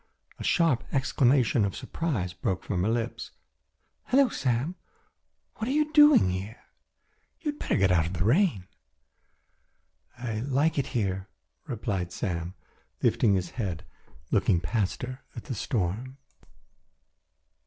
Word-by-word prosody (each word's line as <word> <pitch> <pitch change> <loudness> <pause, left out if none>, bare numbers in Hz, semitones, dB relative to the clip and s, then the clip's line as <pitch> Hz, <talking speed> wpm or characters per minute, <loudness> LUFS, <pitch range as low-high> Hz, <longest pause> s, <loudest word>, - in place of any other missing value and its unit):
A - - -5
sharp 165 -9 +2
exclamation 130 -3 +3
of 100 -2 -1
surprise 130 - -3
broke 90 0 -2
from 90 -4 -1
her 100 - +1
lips: 115 0 -2 0.8
"Hello, 270 0 +4
Sam! 130 - -1 0.8
What 220 - -3
are - - 0
you 305 +1 +1
doing 295 - +7
here? 95 +5 -5 0.8
You 305 -3 -1
had 290 - -15
better - - 0
get 95 -1 +3
in 90 - +5
out 80 -1 +1
of 85 - -5
the 85 -2 -1
rain." 125 - +2 1.5
"I 115 -3 -3
like 140 +5 +1
it 135 - -1
here," 95 -3 -1 0.4
replied 100 - -3
Sam, 90 -3 -3 0.5
lifting 105 -4 +3
his 90 -2 -2
head 95 -9 -4 0.2
and - - -25
looking 85 - +3
past 105 +3 -1
her 130 +1 -6
at 115 - -7
the 135 - -5
storm. 115 - -2
115 Hz, 140 wpm, -28 LUFS, 95-140 Hz, 1.5 s, doing